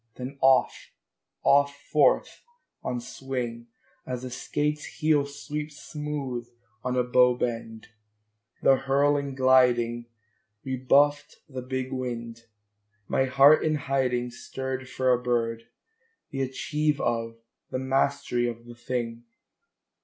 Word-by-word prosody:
then 130 +2 -6
off, 130 -1 +3 0.5
off 140 0 +4
forth - - +2 0.4
on 125 - -2
swing, 120 -2 -5 0.4
As 125 -1 -5
a 130 - -6
skate's 150 +4 -2
heel 150 -2 +1
sweeps 150 +1 -6
smooth 145 -6 -5 0.4
on 125 0 -1
a 125 - +3
bow 125 0 +4
bend: 115 -2 -4 0.7
the 135 - +6
hurl 140 +2 +2
and 140 -2 -3
gliding 120 -3 +3 0.6
Rebuffed 140 +3 +2
the 130 -3 -6
big 130 +1 -4
wind. 115 -2 -5 0.6
My 130 - +2
heart 135 +3 +6
in 155 -1 +1
hiding 130 -4 0
Stirred 130 +1 -5
for 130 0 +2
a 125 - 0
bird, 115 -2 -1 0.6
the 135 - -3
achieve 150 +3 -1
of, 115 -1 -1 0.3
the - - -2
mastery 130 -2 0
of 115 0 -6
the 120 - -10
thing! 120 -1 -4
130 Hz, 120 wpm, -27 LUFS, 120-140 Hz, 0.7 s, the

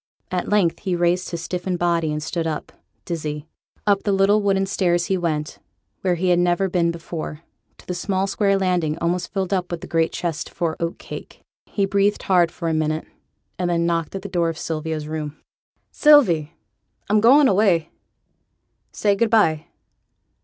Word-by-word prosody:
At 180 -1 -2
length 200 -5 +2
he 185 -3 -1
raised 175 +1 +1
his 170 -1 -5
stiffened 180 +1 -3
body, 170 -2 +1
and 150 0 -3
stood 165 +1 -2
up, 155 -2 -4 0.3
dizzy. 150 -3 -4 0.4
Up 200 -1 +3
the 205 - 0
little 195 +2 +3
wooden 195 -1 +2
stairs 175 -3 +1
he 190 - 0
went, 155 -4 -2 0.4
where 180 -2 +1
he 180 +2 0
had 175 -1 +4
never 175 +2 +2
been 175 -2 +1
before, 165 -2 -6 0.3
to - - -18
the 180 - -3
small 190 +2 -1
square 195 0 +1
landing, 180 -5 0
almost 170 +1 -1
filled 190 0 -2
up 180 -2 -1
with 175 -1 -4
the - - -7
great 165 -1 +1
chest 165 -3 -3
for 165 -2 -2
oat 170 0 -2
cake. - - -10 0.3
He 200 - 0
breathed 200 +1 +1
hard 175 -3 +3
for 170 - -5
a 165 - +1
minute, 155 0 -1 0.5
and 180 -1 0
then 170 -1 +1
knocked 170 0 -1
at 190 - -5
the - - -4
door 175 -3 0
of 165 - -5
Sylvia's 155 -1 -3
room. 155 -1 -5 0.5
'Sylvie! 180 - +5 0.5
I'm 210 +1 +3
going 270 +5 +6
away; 185 -6 +2 1.0
say 205 -1 +1
good 230 +2 +1
by.' 165 -8 +3
175 Hz, 180 wpm, -22 LUFS, 165-195 Hz, 1.0 s, going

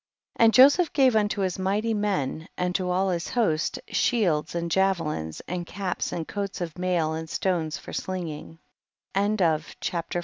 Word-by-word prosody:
44. - - +4
And 225 - +5
Joseph 285 +6 +6
gave 260 -5 +4
unto 210 -1 +1
his 185 -1 -1
mighty 205 +4 0
men, 190 -7 -1
and 180 0 -1
to 180 -1 -1
all 190 +2 +1
his 175 0 -2
host, 185 -10 0
shields 175 -10 +1
and 170 0 -2
javelins, 165 - 0
and 180 0 -3
caps 185 +1 -3
and 165 -2 -4
coats 200 -1 -4
of 170 -3 -4
mail 175 -3 +1
and 160 0 -5
stones 165 -5 -1
for - - -10
sling 185 -2 -3
THE 150 -2 -7 0.6
BOOK 205 +1 +1
OF 160 -2 0
JASHER. 175 0 -2
180 Hz, 175 wpm, -26 LUFS, 165-205 Hz, 0.6 s, Joseph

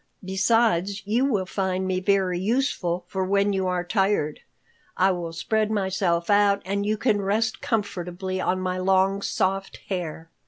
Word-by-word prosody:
Besides, 200 0 +1
you 230 +6 +2
will 210 -9 0
find 190 0 -2
me 185 -1 0
very 185 -2 +1
useful, 190 -5 0
for 190 +1 -2
when 200 +2 +2
you 190 -1 0
are 180 -1 0
tired, 190 -5 0 0.6
I 190 +1 +4
will 175 -2 -3
spread 215 +6 0
myself 190 -4 0
out 205 -1 +4
and 200 +2 -1
you 215 0 +1
can 210 -3 +1
rest 220 +3 0
comfortably 190 -7 -2
on 185 +1 0
my 185 0 -2
long, 190 +1 +2
soft 195 0 -1
hair." 165 -3 -4
190 Hz, 155 wpm, -25 LUFS, 185-205 Hz, 0.6 s, I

